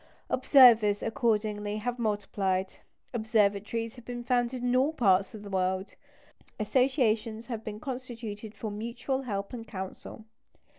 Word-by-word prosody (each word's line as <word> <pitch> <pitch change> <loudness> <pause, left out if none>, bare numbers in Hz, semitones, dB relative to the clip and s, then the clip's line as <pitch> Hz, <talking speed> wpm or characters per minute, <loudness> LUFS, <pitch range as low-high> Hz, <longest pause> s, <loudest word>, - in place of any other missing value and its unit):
Observers, 225 -7 +6
accordingly, 210 -2 0
have 245 +3 -3
multiplied; 195 -3 -1 0.4
observatories 220 0 +1
have 245 - -11
been 240 0 -6
founded 245 0 0
in 245 0 +1
all 265 +4 +3
parts 195 -6 +2
of 210 - -9
the 200 - -8
world; 190 +1 -1 0.7
associations 230 -2 +1
have 230 -2 -5
been 210 -1 -6
constituted 230 -4 -6
for 220 - -5
mutual 235 +5 -3
help 200 -5 -4
and 230 -2 -7
counsel. 190 +2 -8
220 Hz, 130 wpm, -29 LUFS, 205-245 Hz, 0.7 s, Observers